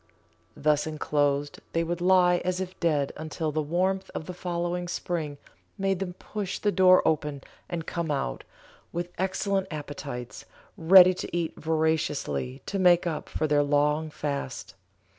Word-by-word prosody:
Thus 150 Hz, +1 st, +2 dB
enclosed 145 Hz, -2 st, 0 dB
they 165 Hz, -, +1 dB
would 170 Hz, +1 st, -3 dB
lie 180 Hz, -1 st, +5 dB
as 180 Hz, +1 st, -2 dB
if 185 Hz, 0 st, -5 dB
dead 150 Hz, -5 st, +1 dB
until 155 Hz, 0 st, -3 dB
the 155 Hz, +1 st, 0 dB
warmth 185 Hz, +5 st, 0 dB
of 160 Hz, -, -4 dB
the 180 Hz, -, -6 dB
following 175 Hz, 0 st, -3 dB
spring 160 Hz, -4 st, -3 dB, 0.4 s
made 195 Hz, -2 st, 0 dB
them 185 Hz, -2 st, -3 dB
push 200 Hz, +1 st, -5 dB
the 205 Hz, -, +1 dB
door 185 Hz, -1 st, +5 dB
open 150 Hz, -3 st, -1 dB, 0.3 s
and 170 Hz, -2 st, -4 dB
come 170 Hz, -2 st, -3 dB
out, 135 Hz, -, -2 dB, 0.5 s
with 175 Hz, +1 st, -4 dB
excellent 190 Hz, +1 st, 0 dB
appetites, 145 Hz, -5 st, -7 dB, 0.3 s
ready 185 Hz, +2 st, +8 dB
to 175 Hz, -1 st, -4 dB
eat 165 Hz, -2 st, -1 dB
voraciously 155 Hz, -4 st, -1 dB
to 195 Hz, -, -3 dB
make 180 Hz, -2 st, +5 dB
up 165 Hz, -3 st, -3 dB
for -, -, -1 dB
their 145 Hz, -1 st, +3 dB
long 150 Hz, +2 st, +1 dB
fast. 140 Hz, -4 st, -4 dB
165 Hz, 150 wpm, -27 LUFS, 150-180 Hz, 0.5 s, ready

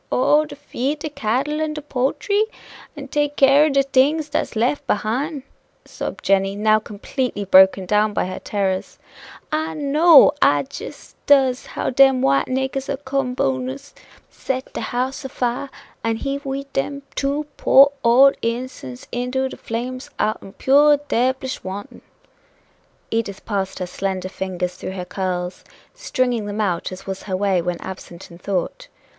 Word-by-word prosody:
"Oh! 295 Hz, +4 st, +3 dB
to 300 Hz, -, -10 dB
feed 290 Hz, 0 st, -3 dB
de 305 Hz, -, -5 dB
cattle 275 Hz, +6 st, -1 dB
and 310 Hz, -1 st, -2 dB
de 300 Hz, -, -5 dB
poultry? 295 Hz, +10 st, 0 dB, 0.5 s
and 280 Hz, -2 st, -9 dB
take 290 Hz, 0 st, 0 dB
care 275 Hz, +2 st, +6 dB
o' -, -, +2 dB
de 275 Hz, -1 st, +3 dB
things 285 Hz, +3 st, +2 dB
dat's 290 Hz, -, -2 dB
lef 245 Hz, +6 st, +1 dB
behine," 265 Hz, +8 st, -1 dB, 0.4 s
sobbed -, -, -6 dB
Jenny, 195 Hz, 0 st, +2 dB
now 215 Hz, +1 st, +3 dB
completely 210 Hz, +1 st, -4 dB
broken 190 Hz, 0 st, +6 dB
down 210 Hz, +3 st, +2 dB
by 205 Hz, -, -1 dB
her 185 Hz, -, -5 dB
terrors. 190 Hz, -2 st, -2 dB, 0.5 s
"I 315 Hz, +1 st, -1 dB
know 300 Hz, +2 st, +6 dB
I 145 Hz, 0 st, +4 dB
jis 400 Hz, -, -10 dB
does 265 Hz, -3 st, +4 dB
how -, -, -3 dB
dem 270 Hz, 0 st, +5 dB
white 135 Hz, 0 st, +3 dB
niggers 265 Hz, +1 st, -2 dB
o' -, -, -2 dB
Co'bu'ns 250 Hz, -, -2 dB
'ill -, -, -21 dB, 0.2 s
set 260 Hz, 0 st, -5 dB
de -, -, -4 dB
house 255 Hz, +3 st, -2 dB
o' 265 Hz, -, -5 dB
fire, 250 Hz, +2 st, -2 dB, 0.3 s
an' 225 Hz, 0 st, 0 dB
heave 275 Hz, +4 st, -4 dB
we 270 Hz, +1 st, -3 dB
dem 280 Hz, +1 st, -2 dB
two 285 Hz, +2 st, -1 dB
poor 275 Hz, +1 st, +6 dB
old 255 Hz, +4 st, +6 dB
innocen's 230 Hz, -, -4 dB
into 250 Hz, +2 st, -1 dB
de -, -, -9 dB
flames 250 Hz, +3 st, -5 dB
out'n 215 Hz, -2 st, -2 dB
pure 290 Hz, +5 st, +5 dB
debblish 260 Hz, +2 st, 0 dB
wanton!" 195 Hz, +2 st, -7 dB, 1.1 s
Edith 225 Hz, -4 st, -3 dB
passed 195 Hz, -3 st, -2 dB
her 185 Hz, -, -3 dB
slender 185 Hz, +1 st, -3 dB
fingers 185 Hz, -2 st, -3 dB
through 190 Hz, -, -6 dB
her 180 Hz, -2 st, -5 dB
curls, 180 Hz, -1 st, -3 dB, 0.3 s
stringing 250 Hz, -, -1 dB
them 205 Hz, +1 st, -4 dB
out 185 Hz, -5 st, -1 dB
as 185 Hz, -, -9 dB
was 190 Hz, 0 st, -5 dB
her 185 Hz, -, 0 dB
way 195 Hz, -2 st, +1 dB
when 175 Hz, 0 st, -3 dB
absent 185 Hz, -1 st, -9 dB
in 170 Hz, -, -13 dB
thought. 200 Hz, -, -3 dB
250 Hz, 160 wpm, -21 LUFS, 195-275 Hz, 1.1 s, care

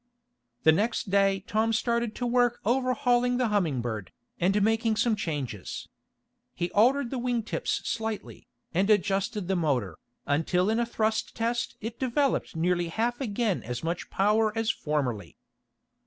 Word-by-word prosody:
The 160 Hz, -, +7 dB
next 205 Hz, +3 st, 0 dB
day 195 Hz, -1 st, +3 dB
Tom 220 Hz, +2 st, +1 dB
started 235 Hz, 0 st, 0 dB
to 245 Hz, -, -3 dB
work 245 Hz, 0 st, +2 dB
overhauling 250 Hz, 0 st, +2 dB
the 250 Hz, -3 st, +1 dB
Humming 170 Hz, -12 st, +1 dB
Bird, 110 Hz, -5 st, -4 dB, 0.3 s
and 195 Hz, +4 st, +3 dB
making 225 Hz, +1 st, +2 dB
some 225 Hz, 0 st, +2 dB
changes. 140 Hz, -, -4 dB, 0.7 s
He 175 Hz, 0 st, -2 dB
altered 250 Hz, +4 st, +3 dB
the 265 Hz, -, -2 dB
wing 240 Hz, -2 st, 0 dB
tips -, -, -2 dB
slightly, 225 Hz, -2 st, -4 dB, 0.3 s
and 190 Hz, +4 st, +2 dB
adjusted 200 Hz, -1 st, +1 dB
the 190 Hz, -, +1 dB
motor, 130 Hz, -, 0 dB, 0.3 s
until 180 Hz, +7 st, +1 dB
in 225 Hz, -, +1 dB
a 235 Hz, -, 0 dB
thrust 220 Hz, -1 st, -1 dB
test 235 Hz, +1 st, -1 dB
it 225 Hz, +2 st, -6 dB
developed 265 Hz, -, 0 dB
nearly 175 Hz, +1 st, +1 dB
half 235 Hz, +8 st, -1 dB
again 220 Hz, -4 st, 0 dB
as 120 Hz, +3 st, -5 dB
much 170 Hz, +2 st, -3 dB
power 215 Hz, +2 st, +2 dB
as 225 Hz, 0 st, +2 dB
formerly. 135 Hz, -, -3 dB
215 Hz, 150 wpm, -28 LUFS, 175-235 Hz, 0.7 s, The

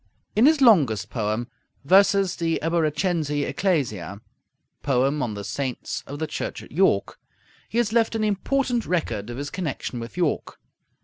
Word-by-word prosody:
In 230 Hz, +6 st, +6 dB
his 310 Hz, -2 st, +4 dB
longest 145 Hz, -, +4 dB
poem, 110 Hz, +1 st, -2 dB, 0.4 s
'Versus 195 Hz, +2 st, +4 dB
de 165 Hz, -1 st, 0 dB
Eboracensi 160 Hz, -2 st, 0 dB
Ecclesia' 110 Hz, -, -1 dB, 0.6 s
(Poem 135 Hz, +2 st, +1 dB
on 110 Hz, -4 st, -2 dB
the 100 Hz, -, -6 dB
Saints 130 Hz, +4 st, -4 dB
of 145 Hz, -, -6 dB
the 160 Hz, -, -2 dB
Church 155 Hz, -, -5 dB
at -, -, -15 dB
York), 155 Hz, -, +1 dB, 0.5 s
he 230 Hz, -, -3 dB
has 230 Hz, -2 st, +1 dB
left 230 Hz, -1 st, +2 dB
an 220 Hz, -, 0 dB
important 240 Hz, +4 st, 0 dB
record 120 Hz, -, -2 dB
of 120 Hz, -, -6 dB
his 145 Hz, +1 st, -5 dB
connection 150 Hz, -8 st, -4 dB
with 115 Hz, +7 st, -8 dB
York. 170 Hz, -4 st, -1 dB
155 Hz, 150 wpm, -24 LUFS, 125-195 Hz, 0.6 s, In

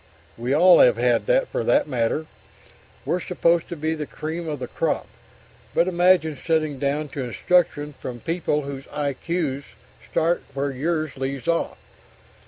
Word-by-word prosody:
We 120 Hz, +2 st, -3 dB
all 180 Hz, +4 st, +7 dB
have -, -, +6 dB
had, -, -, +2 dB, 0.2 s
for -, -, -2 dB
that -, -, +3 dB
matter. 125 Hz, +3 st, 0 dB, 0.8 s
We're 170 Hz, +6 st, 0 dB
supposed 170 Hz, -2 st, +1 dB
to 170 Hz, -, -4 dB
be 160 Hz, +1 st, -1 dB
the 155 Hz, -2 st, -4 dB
cream 160 Hz, +2 st, -5 dB
of 150 Hz, -, -3 dB
the 125 Hz, -2 st, -5 dB
crop, -, -, -1 dB, 0.7 s
but 170 Hz, -, +3 dB
imagine 175 Hz, -3 st, +3 dB
sitting 155 Hz, -4 st, 0 dB
down 145 Hz, +2 st, -1 dB
to 140 Hz, -, -5 dB
instruction 150 Hz, -, +1 dB
from 125 Hz, -2 st, -7 dB
people 160 Hz, +1 st, -1 dB
whose 140 Hz, -1 st, -7 dB
I.Q.s 145 Hz, 0 st, -2 dB, 0.5 s
start 165 Hz, +2 st, +1 dB
where 140 Hz, +1 st, -1 dB
yours 155 Hz, +2 st, -2 dB
leaves 135 Hz, -1 st, -4 dB
off! 165 Hz, 0 st, 0 dB
155 Hz, 150 wpm, -23 LUFS, 140-170 Hz, 0.8 s, all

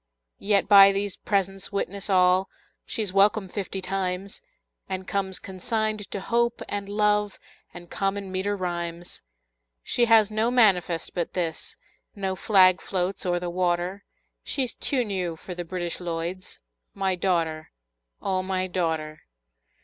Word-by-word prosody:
Yet 200 Hz, -1 st, +2 dB
by 200 Hz, -1 st, +9 dB
these 200 Hz, 0 st, -2 dB
presents 195 Hz, -1 st, -2 dB
witness 200 Hz, 0 st, -3 dB
all 185 Hz, 0 st, +4 dB, 0.4 s
She's 210 Hz, -4 st, -2 dB
welcome 200 Hz, 0 st, +4 dB
fifty 190 Hz, 0 st, -4 dB
times, 190 Hz, -, -3 dB, 0.5 s
And 190 Hz, -1 st, -4 dB
comes 190 Hz, -1 st, -1 dB
consigned 215 Hz, +2 st, -3 dB
to 200 Hz, -, -4 dB
Hope 235 Hz, +3 st, 0 dB
and 200 Hz, -1 st, -4 dB
Love 210 Hz, 0 st, +1 dB, 0.3 s
And 175 Hz, 0 st, -11 dB
common 195 Hz, +1 st, -2 dB
meter 195 Hz, +2 st, -1 dB
rhymes. 175 Hz, -1 st, -4 dB, 0.6 s
She 240 Hz, -, +2 dB
has 220 Hz, -2 st, +5 dB
no 220 Hz, +2 st, +1 dB
manifest 190 Hz, -9 st, +2 dB
but 175 Hz, -2 st, -3 dB
this, 170 Hz, -3 st, -3 dB, 0.4 s
No 190 Hz, -2 st, -2 dB
flag 185 Hz, -2 st, +5 dB
floats 185 Hz, 0 st, -2 dB
o'er 175 Hz, 0 st, +1 dB
the 175 Hz, 0 st, -4 dB
water, 180 Hz, +2 st, -1 dB, 0.4 s
She's 260 Hz, -4 st, -2 dB
too 255 Hz, -4 st, 0 dB
new 185 Hz, -5 st, -2 dB
for 180 Hz, +3 st, -8 dB
the 175 Hz, 0 st, -5 dB
British 175 Hz, 0 st, -4 dB
Lloyds 175 Hz, +1 st, -5 dB, 0.3 s
My 195 Hz, -1 st, 0 dB
daughter, 170 Hz, -4 st, -1 dB, 0.5 s
O 190 Hz, -1 st, 0 dB
my 185 Hz, 0 st, -1 dB
daughter! 160 Hz, -4 st, -2 dB
190 Hz, 135 wpm, -25 LUFS, 180-200 Hz, 0.6 s, by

